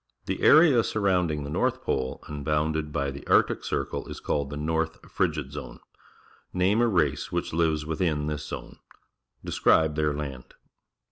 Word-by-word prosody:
The - - -3
area 150 -7 +6
surrounding 90 -9 0
the 70 - -6
north - - 0
pole 65 -1 -2
and 75 -1 -6
bounded 75 +1 0
by 70 -1 -1
the 70 - -9
Arctic - - +3
Circle - - -3
is - - -7
called 70 -2 -1
the 70 - -6
N 75 +1 -4
orth 80 0 -1
Frigid^Zone, 75 -5 -3 0.7
Name 95 +5 +2
a 120 - +3
cace 80 -9 0
which - - -2
lives 80 -2 +1
within 80 -2 -1
this 75 -2 -4
zone. - - -8 0.7
Describe 80 -1 +3
their 75 -1 0
land. 70 -3 -7
75 Hz, 155 wpm, -26 LUFS, 75-85 Hz, 0.7 s, area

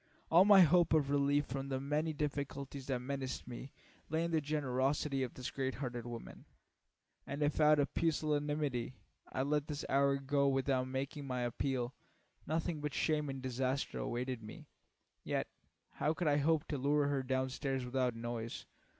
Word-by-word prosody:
All 175 +4 +8
my 200 -2 +9
hope 175 0 +5
of 145 -3 +3
relief 145 0 +3
from 135 +1 -4
the 130 -1 -1
many 150 +4 0
difficulties 140 -2 -4
that 130 -3 0
menaced 130 -1 -4
me 125 +2 -7 0.4
lay 160 +2 +1
in 170 - -1
the 160 -1 +2
generosity 140 -1 0
of 125 -3 -3
this 125 - -5
great 130 -1 -2
hearted 120 -3 -4
woman, 120 -1 -8 0.8
and 140 +2 -2
if 145 +1 +1
out 150 0 +6
of 145 -1 +1
pusillanimity 150 -5 0 0.4
I 130 - 0
let 150 +1 0
this 150 -2 -4
hour 140 0 +4
go 140 0 +2
by 135 - +1
without 130 -1 +1
making 135 +2 -4
my 125 -1 -2
appeal, 125 +1 -1 0.5
nothing 160 0 -1
but 150 -2 -3
shame 150 -2 +1
and 135 -1 -5
disaster 130 +2 -1
awaited 125 0 -2
me. 110 0 -10 0.6
Yet - - -1 0.5
how 155 +2 0
could 175 -1 -1
I 145 -1 +4
hope 155 +2 +2
to 145 - -2
lure 145 +2 +3
her 140 -1 +1
down 130 0 -1
stairs 135 -1 -2
without 125 -1 0
noise? 115 0 -5
140 Hz, 175 wpm, -35 LUFS, 130-150 Hz, 0.8 s, my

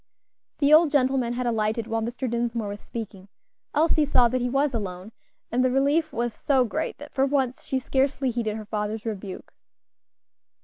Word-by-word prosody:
The 290 0 +4
old 315 0 +7
gentleman 260 -4 +2
had 250 +1 -2
alighted 220 -1 0
while 225 0 -1
Mr. 240 +3 -3
Dinsmore 235 -2 -1
was 205 0 -6
speaking; 205 -4 -7 0.5
Elsie 310 0 +3
saw 255 -4 +4
that 255 +1 -1
he 245 - 0
was 275 +2 +1
alone, 190 -2 -5 0.4
and 250 +2 +2
the 255 - +3
relief 285 +5 +2
was 235 0 -2
so 265 0 +2
great 220 - -3
that 295 +1 -11
for 270 0 +2
once 265 -3 0
she 265 - -1
scarcely 265 0 0
heeded 225 -2 -2
her 215 - -7
father's 210 +1 -3
rebuke. 200 -4 -6
240 Hz, 175 wpm, -25 LUFS, 220-270 Hz, 0.5 s, old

